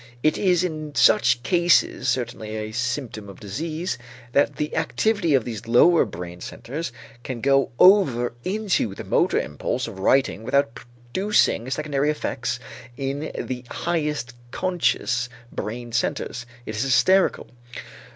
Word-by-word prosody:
It 155 - +3
is 180 -3 +2
in 155 -4 -4
such 125 - +4
cases 170 -2 +3
certainly 120 -3 -2
a 110 0 -4
symptom 115 -2 -3
of 95 - -12
disease 155 - -4 0.3
that 140 +2 +2
the 150 - -3
activity 205 -9 +1
of 130 - +1
these 115 -1 -6
lower 160 +9 +5
brain 90 0 -8
centers 150 +5 -6 0.3
can 125 -1 -5
go 135 +2 +3
over 170 - +5
into 190 - 0
the - - -7
motor - - +2
impulse 75 - -2
of 105 -4 -9
writing 130 +2 +2
without 130 +1 +1
producing 120 - 0
secondary 145 0 0
effects 150 - -2 0.4
in 140 +3 -3
the 125 -1 -4
highest 150 -7 -2 0.2
conscious 125 -8 0 0.2
brain 120 +3 -5
centers; 120 0 -2 0.2
it 110 - -5
is 105 - -1
hysterical. 185 +9 +3
135 Hz, 130 wpm, -23 LUFS, 120-160 Hz, 0.4 s, lower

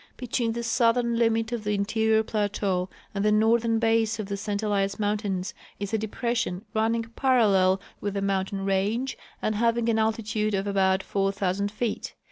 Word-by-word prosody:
BetAveen 235 -2 -1
the 235 - -3
southern 235 0 +2
limit 225 0 +1
of 235 -3 -3
the 210 0 0
interior 220 +2 +2
plateau 200 -4 -1 0.2
and 200 -1 -1
the 210 - +3
northern 225 +1 +3
base 225 -1 +2
of 215 - -3
the 200 0 -3
St 205 +1 -3
Elias 200 -1 0
mountains 205 -3 -1 0.3
is 200 0 -4
a - - +3
depression 220 -2 -2
running,, 225 +1 +1
23arallel 220 -6 +3 0.2
Avith 205 -1 -2
the 200 - -2
mountain 195 0 -1
range 205 +7 0 0.3
and 215 - +1
having 230 +1 +1
an 220 -1 +2
altitude 215 -1 0
of 195 +1 -1
about 190 -1 +2
4,000 195 0 0
feet. 220 +1 -3
215 Hz, 165 wpm, -26 LUFS, 200-230 Hz, 0.3 s, the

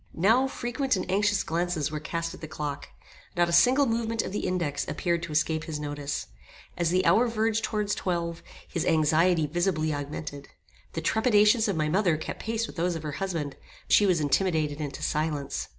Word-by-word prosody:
Now 225 +10 +4
frequent 260 0 -1
and 185 - -2
anxious 205 0 +2
glances 165 -2 -1
were 155 - -3
cast 165 +2 -3
at - - -12
the 155 - -6
clock. 145 -2 -5 0.5
Not 175 0 +3
a - - -2
single 255 +11 +5
movement 230 -1 0
of - - -5
the 205 - -2
index 160 -6 -1
appeared 170 -2 -1
to 170 -2 -6
escape 155 +1 0
his 155 -2 -4
notice. 145 -1 -4 0.5
As 170 -1 0
the 185 +2 +2
hour 245 +2 +5
verged 225 -1 0
towards 210 -2 -1
twelve 170 -2 -2 0.3
his 170 - -2
anxiety 160 +1 +3
visibly 155 -1 0
augmented. 145 0 -6 0.5
The 165 - -3
trepidations 220 +3 +4
of 200 - 0
my 155 -1 0
mother 175 -1 +2
kept 155 - -6
pace 225 0 -1
with - - -11
those 175 +1 0
of 160 - -5
her 150 - -3
husband; 165 -7 -3 0.3
but - - -1
she 205 - +6
was 180 -3 +3
intimidated 155 -1 +1
into 140 -2 -5
silence. 150 -2 -2
170 Hz, 190 wpm, -27 LUFS, 155-205 Hz, 0.5 s, she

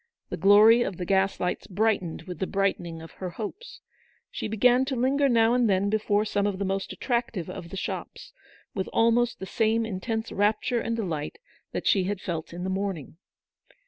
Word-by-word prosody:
The - - -4
glory 215 +4 +7
of 195 -6 -2
the 180 - -4
gas 195 +1 +1
lights 180 - -2
brightened 200 -5 0
with 180 -2 -8
the 190 - -1
brightening 175 -5 -1
of 165 - -11
her 185 - -4
hopes. 220 - -8 0.5
She - - -4
began 245 +4 +4
to 265 0 -2
linger 270 +3 +2
now 230 -1 +4
and 245 -3 +3
then 195 +1 +2
before 210 -1 +1
some 205 -1 0
of 200 -2 -2
the 200 - -2
most 195 0 -2
attractive 235 - -2
of 170 - -8
the 195 - -7
shops, - - -6 0.4
with 190 -2 -3
almost 230 +1 +2
the 190 - -5
same 225 +3 +1
intense 220 +2 -3
rapture 215 +4 +1
and 230 - -2
delight 170 -10 -3 0.3
that - - -4
she 190 -3 +3
had 200 0 -2
felt 165 -5 -5
in 175 +1 -6
the 190 - -2
morning. 190 -6 -4
205 Hz, 190 wpm, -26 LUFS, 185-230 Hz, 0.5 s, glory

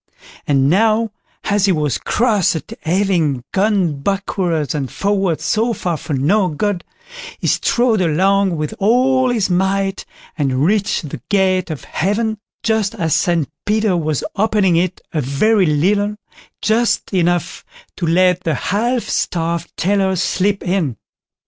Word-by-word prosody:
And 135 -2 +3
now, 220 +6 +2 0.3
as 205 -1 +1
he 195 - +3
was 150 -7 0
cross 215 -7 +1
at 160 +7 -6
having 165 -7 0
gone 190 -8 +1
backwards 180 -4 -1
and 135 -5 -3
forwards 195 -5 -1
so 230 +1 +1
far 175 -6 -2
for 155 - -5
no 185 +9 +2
good, 180 +4 -2 0.5
he - - -7
strode 235 -4 +2
along 190 +2 +2
with 150 -1 -3
all 255 +5 +3
his 220 -6 0
might, 195 +2 0 0.3
and 135 -2 0
reached 200 -5 0
the 125 - -7
gate 185 -3 +2
of 155 -3 -5
Heaven 215 +5 -1 0.2
just 220 -3 0
as 160 -3 0
St 165 -1 +1 0.2
Peter 215 -2 +1
was 155 -4 -1
opening 205 -4 +2
it 180 +1 0
a 155 - 0
very 185 - +2
little, 200 +8 +1 0.5
just 225 0 +1
enough 175 -2 0 0.3
to 170 - -2
let 180 +1 +3
the 160 -4 0
half 235 - 0
starved 170 0 -2
tailor 190 +1 +1
slip 195 +2 0
in. 175 - -1
190 Hz, 140 wpm, -18 LUFS, 165-210 Hz, 0.5 s, And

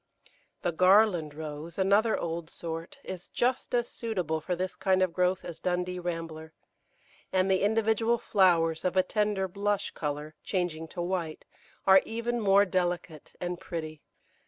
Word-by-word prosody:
The 175 - +1
Garland 185 -3 +4
Rose, 155 +1 -7
another 200 +4 +3
old 165 -1 -4
sort, 165 0 -6
is 180 -2 -7
just 250 0 0
as 240 0 +1
suitable 180 -11 -2
for 180 +3 -2
this 185 +1 -3
kind 190 -1 +2
of 180 -2 0
growth 180 0 +1
as 165 -2 -7
Dundee 180 0 -1
Rambler, 165 -2 -5 0.8
and 190 +1 +2
the 190 - +3
individual 225 +2 +2
flowers, 170 -7 +3
of 185 +1 0
a 185 - +6
tender 205 -1 0
blush 200 +2 -1
colour, 150 0 -4
changing 175 -4 -2
to 175 +2 -5
white, 175 -3 -3 0.4
are 190 0 +8
even 235 +1 -2
more 200 0 +5
delicate 175 -4 -2
and 175 -1 -3
pretty. 155 -3 -6
180 Hz, 150 wpm, -29 LUFS, 165-200 Hz, 0.8 s, are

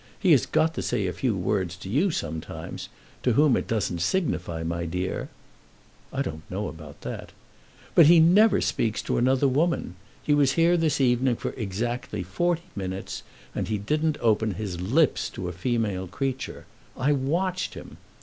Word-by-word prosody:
He 190 -4 +3
has 140 -6 +5
got 160 +1 +2
to - - -3
say 100 - -1
a 90 - -1
few 125 -6 0
words 90 -1 -1
to 95 - -10
you 145 - +2
sometimes, 80 - -5 0.3
to 125 - +2
whom 145 +1 +5
it - - -2
doesn't 95 -6 -1
signify, 90 - -1
my 85 +1 -2
dear 90 +3 -3 0.4
" - - -30
"I - - -1
don't 80 - -5
know 100 +3 -3
about 75 -2 -10
that." - - -6 0.6
"But 165 - +8
he 170 +1 +8
never 195 +5 +6
speaks 110 -3 0
to - - 0
another 130 +3 +3
woman. 150 - +1 0.3
He 150 - +2
was 140 -2 +4
here 170 +1 +4
this 160 -5 +1
evening 125 -1 +3
for - - -4
exactly 115 -1 -3
forty 170 - 0
minutes, 95 -1 -4 0.3
and - - -2
he 110 - 0
didn't 150 +9 0
open 110 -3 +2
his 95 -3 -4
lips 120 - +2
to 90 - -6
a - - -3
female 100 -1 -1
creature. 130 +7 -4 0.3
I 135 +3 +2
watched 170 +7 0
him. - - -10
120 Hz, 175 wpm, -26 LUFS, 95-150 Hz, 0.6 s, But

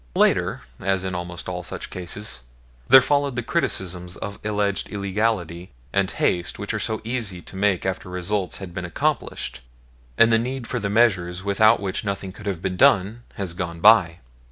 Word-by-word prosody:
Later, - - +2 0.2
as 95 -1 0
in 95 -1 -3
almost 90 0 -5
all 90 0 -3
such - - -6
cases, 90 - -5 0.5
there 130 -1 +9
followed 140 -2 +1
the 120 - -2
criticisms 95 - -2
of 100 0 -6
alleged 105 -2 -1
illegality 100 -3 -1 0.2
and 95 -1 +2
haste 90 -1 -1
which - - -4
are - - -1
so 110 -1 -2
easy 110 -6 -3
to 95 - -12
make 95 -2 +1
after 95 0 -3
results 90 +1 -2
have 95 -3 -8
been 90 - -4
accomplished 85 -6 -2 0.6
and 115 0 +6
the 115 - +5
need 125 +1 -3
for 125 - -2
the 100 -2 -2
measures 95 -5 +2
without 110 +3 +4
which 95 -2 -3
nothing 100 -2 -3
could 105 +2 -10
have 95 -4 -3
been 90 -1 -2
done 100 +6 +4
has 95 -4 -3
gone 85 -2 -4
by. 85 -4 +6
95 Hz, 180 wpm, -23 LUFS, 90-110 Hz, 0.6 s, there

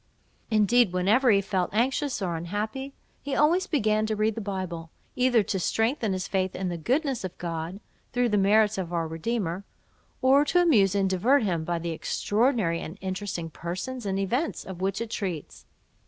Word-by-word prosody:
Indeed, 220 -1 +4
whenever 210 +8 +3
he 200 -3 +5
felt 190 -2 -1
anxious 260 0 0
or 175 -2 -1
unhappy, 215 +11 -4 0.3
he 285 -1 -3
always 345 +6 +3
began 215 -7 +1
to 215 - -1
read 215 +1 +1
the 225 - -5
Bible, 185 -5 -4 0.3
either 250 -3 +3
to 195 0 -2
strengthen 225 - 0
his 185 0 -3
faith 190 -1 -1
in 185 0 -2
the 175 - -3
goodness 265 - 0
of 185 -2 -6
God 170 +2 -4 0.3
(through 245 -1 +1
the 210 - +2
merits 210 +1 +3
of 175 -2 -4
our 165 -2 -1
Redeemer), 180 +2 -2 0.6
or 270 +2 +5
to 355 - +3
amuse 220 - +4
and 195 -1 +2
divert 230 +9 +3
him, 170 -6 0
by 170 +1 -1
the 170 0 -3
extraordinary 205 - 0
and 165 +5 -7
interesting 185 -3 -4
persons 200 +9 -5
and 195 0 -1
events 240 - -1
of 185 -2 -8
which 195 +2 -1
it 230 -1 -4
treats. 180 -9 -5
205 Hz, 180 wpm, -27 LUFS, 180-240 Hz, 0.6 s, he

